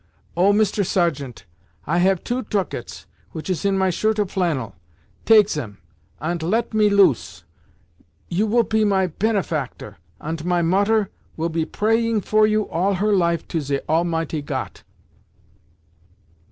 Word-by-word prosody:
Oh, 185 +4 +4
Mister 205 0 +2
Sergeant, 150 - -1 0.4
I 170 +4 +1
have 190 0 +2
two 245 +1 -2
tucats 205 -5 -4 0.3
which 160 +4 -4
is 180 0 -3
in 195 -1 +2
my 190 -1 +2
shirt 215 +5 0
of 205 -3 -1
flannel. 160 - -1 0.5
Take 215 -3 +6
zem, 120 - -5 0.4
ant 170 +2 -3
let 220 +8 -1
me 215 -1 +4
loose! 135 - +2 0.8
You 195 +5 0
will 235 +2 +3
pe 220 0 +1
my 195 -2 +2
penefactor, 175 - -2 0.2
ant 160 0 -5
my 175 0 +1
Mutter 200 +4 +2 0.3
will 165 +1 -1
be 160 -1 -1
praying 225 +3 0
for 215 +2 +3
you 215 -1 0
all 190 +5 0
her 210 +3 +1
life 170 -3 +1
to 165 - -1
ze 140 -1 -2
Almighty 165 -1 0
Got! 145 - -5
185 Hz, 145 wpm, -22 LUFS, 165-210 Hz, 0.8 s, Take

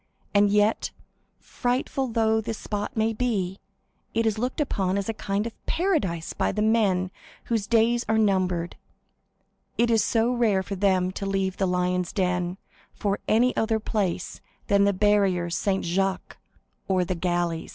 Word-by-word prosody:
And 205 0 +5
yet, 210 +2 +2 0.5
frightful 255 +2 -2
though 220 -1 +2
this 220 0 -4
spot 210 +4 -4
may 220 +1 +2
be, 205 -6 -1 0.6
it 230 0 +2
is 220 -1 0
looked 250 +5 -2
upon 195 -10 0
as 200 - -2
a 225 - -1
kind 205 0 -2
of 230 - -5
paradise 290 - 0
by - - 0
the 210 - -1
men 200 -5 +2 0.3
whose 225 -4 -1
days 235 +1 +3
are 220 - +3
numbered; 185 -5 +1 1.0
it 235 0 +3
is 225 -1 +4
so 230 +2 +1
rare 215 -6 +2
for 200 - -6
them 185 -2 +2
to 195 +1 -5
leave 195 -1 -1
the 190 - +1
Lions' 180 0 0
Den 180 -1 -1 0.4
for 200 -1 -1
any 245 +3 +3
other 220 0 +1
place 195 -5 -2 0.2
than 200 0 +3
the 200 - +4
barrier 195 -3 +2
Saint 190 +2 0
Jacques, 190 +2 -1 0.5
the 185 -2 +2
galleys! 175 -1 -1
200 Hz, 155 wpm, -25 LUFS, 185-225 Hz, 1.0 s, And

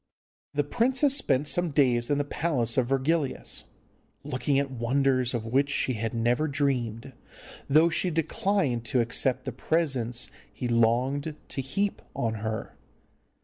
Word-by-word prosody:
The 145 - +2
princess 260 - +2
spent 145 - +1
some 175 +5 +1
days 125 -5 +2
in 145 - +2
the 145 - +1
palace 140 -6 -1
of 130 -3 +2
Virgilius, 135 +2 0 0.6
looking 130 +2 0
at 140 -1 0
wonders 130 +1 +1
of 115 -2 -3
which 140 +2 +3
she 135 -2 +1
had 115 0 -2
never 120 +6 +1
dreamed, 130 -4 -1 0.6
though 155 +4 +6
she 175 +2 0
declined 165 - 0
to 125 +2 +1
accept 120 +3 0
the 130 - -2
presents 130 -3 0 0.2
he 125 - -4
longed 125 +6 +1
to 135 - -3
heap 195 +10 -2
on 115 -1 -1
her. 110 0 -4
135 Hz, 145 wpm, -27 LUFS, 120-150 Hz, 0.6 s, though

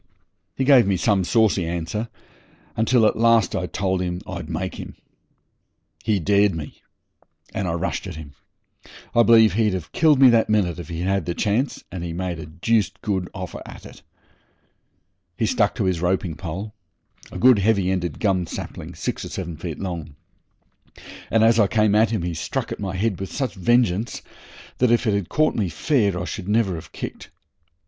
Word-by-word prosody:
He 135 - -1
gave 130 -5 +6
me 95 -2 +2
some 95 +1 +2
saucy 105 -1 +2
answer, 85 +7 -3 0.7
until 115 +1 +3
at - - +2
last 115 -3 +4
I 90 -1 -2
told 95 -1 -1
him 90 -1 -2
I'd 85 -4 -6
make 90 +2 -3
him. - - -8 1.1
He 105 -3 +1
dared 100 +1 +3
me, 75 -2 -8 0.7
and 95 - -2
I 85 - -1
rushed 90 +3 -3
at 90 - -7
him. 75 -3 -10 0.8
I 120 - +5
believe 115 -4 +6
he'd 105 -2 +1
have 85 -4 -6
killed 155 -4 +4
me 130 -2 +8
that 115 -2 +3
minute 90 -6 +1
if 85 - -8
he'd 85 0 -4
had 95 -2 0
the 85 - -2
chance, 110 +7 -1
and 90 -2 -5
he 85 -1 -4
made 90 -1 -3
a 80 - -8
deuced 95 +4 0
good 95 -4 -1
offer 95 -2 -6
at - - -12
it. - - -13 1.4
He - - +1
stuck - - +1
to - - -1
his 90 -3 0
roping 90 -1 0
stick 75 - -11 0.9
a - - -7
good, 125 -4 +6
heavy 100 -2 +2
ended 90 -4 -2
gum 95 -5 +1
sapling, - - -7
six - - -3
or - - -6
seven 85 -3 -5
feet 80 -1 -6
long 85 -6 -5 1.1
and 110 -1 +3
as 115 +1 +5
I 105 - +5
came 105 +1 +2
at 110 +1 +4
him 110 -6 -2
he 85 -1 -2
struck 80 - -3
at - - -5
my 95 -2 -4
head 100 0 -1
with 95 - -5
such 135 -3 -2
vengeance 110 +1 +1 0.6
that, 125 - +3
if 120 +2 +2
it 110 - +2
had 100 -4 -2
caught 155 0 +2
me 100 -5 -1
fair, 100 - +1
I - - -3
should 100 -2 -6
never 105 -3 +2
have 80 - -8
kicked. - - -7
95 Hz, 190 wpm, -22 LUFS, 90-110 Hz, 1.4 s, me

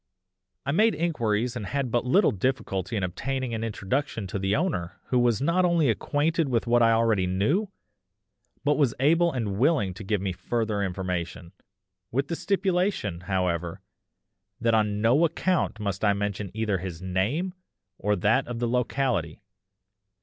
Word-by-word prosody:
I 140 - 0
made 215 +8 +3
inquiries 125 -8 0
and 110 -5 -4
had 140 -4 -2
but 120 +1 0
little 190 +11 +4
difficulty 105 -2 -2
in 100 - -1
obtaining 130 +7 -3
an 110 0 -2
introduction 115 +2 -2
to 95 +1 -4
the 95 +1 +1
owner 140 - -2
who 125 - +3
was 120 0 +2
not 170 +5 +2
only 170 -7 +3
acquainted 155 +5 0
with 120 -2 +1
what 120 0 +3
I 115 0 +5
already 115 -5 +2
knew, 110 - +1 1.0
but 145 +1 +2
was 135 -6 +2
able 165 +5 +4
and 105 -6 -3
willing 130 - +2
to 100 - -9
give 105 +1 0
me 95 0 -2
further 110 +2 -2
information, 90 -2 -3 0.6
with 135 +4 -1
the 170 - -1
stipulation, 185 - 0
however, 90 -3 -1 0.8
that 115 -1 +2
on 105 -2 +1
no 125 +8 +4
account 170 -6 0
must 100 -2 -3
I 100 -1 +4
mention 100 0 -3
either 110 -4 0
his 90 -1 -6
name 110 - -1 0.5
or 105 +1 +1
that 110 +8 +2
of 120 -1 -4
the 120 0 -1
locality. 120 - -1
115 Hz, 160 wpm, -26 LUFS, 100-140 Hz, 1.0 s, I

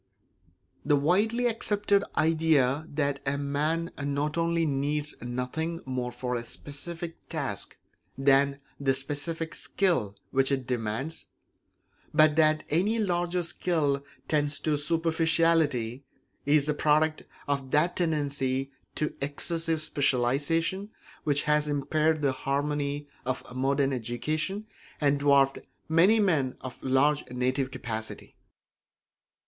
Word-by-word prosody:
The 145 0 +3
widely 205 - +2
accepted 205 -3 +2
idea 155 -3 +3
that 145 -1 0
a 140 0 0
man 150 +4 -1
not 145 +2 -1
only 170 0 +1
needs 145 +1 -1
nothing 125 +7 -3
more 125 -2 -3
for 125 +1 -4
a 120 -1 -2
specific 165 +6 -6
task - - -4 0.4
than 140 +1 +3 0.2
the 135 -1 +2
specific 155 +4 -3
skill 165 - 0 0.2
which 135 +1 +2
it 135 -2 0
demands, 125 +6 -3 0.9
but 155 -1 +6
that 155 -1 +4
any 195 +9 +2
larger 175 -3 0
skill 155 -5 0 0.2
tends 145 -1 +1
to 155 -1 +1
superficiality, 160 -5 +1 0.4
is 145 0 +4
the 150 - +1
product 155 +1 +2 0.3
of 140 -2 -1
that 150 +6 +2
tendency 140 -5 0 0.2
to 150 - -1
excessive 165 +3 -1
specialisation 155 - 0 0.4
which 145 -2 +2
has 150 0 +2
impaired 155 +2 +1
the 140 - +3
harmony 145 +2 -2 0.2
of 130 +1 -2
modern 135 +1 +1
education 155 - -2 0.3
and 145 -1 +2
dwarfed 140 -1 +4 0.3
many 175 +8 +5
men 155 -11 +1
of 130 -1 -8
large 140 +3 +2
native 130 +2 0
capacity. 110 -4 -5
145 Hz, 115 wpm, -28 LUFS, 135-165 Hz, 0.9 s, but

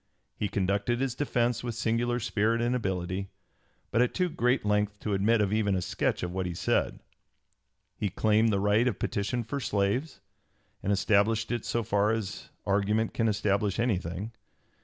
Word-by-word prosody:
He 105 - -2
conducted 100 +6 0
his 135 -2 0
defence 120 -3 0
with 120 -2 -3
singular 120 +2 0
spirit 115 0 +1
and 120 +1 +1
ability, 95 -3 -2 0.6
but 115 - +3
at 125 - +1
too 180 -1 +1
great 130 -8 +1
length 105 0 +1
to 105 - -2
admit 105 +3 +3
of 100 0 +1
even 105 -3 +2
a 90 - 0
sketch - - -1
of 90 - -2
what 95 0 -2
he 90 - -4
said. - - 0 0.9
He 105 - -1
claimed 110 +3 +3
the 100 - +1
right 105 +4 +3
of 115 - 0
petition 110 +4 -1
for 140 +6 -4
slaves, 105 +6 -1 0.6
and 100 - -1
established 105 +3 +2
it 120 -2 -2
so 115 - -1
far 100 0 +2
as 110 -3 -3 0.2
argument 105 +3 +1
can 115 - +1
establish 105 -1 +1
anything. 100 -3 -1
105 Hz, 170 wpm, -29 LUFS, 100-120 Hz, 0.9 s, but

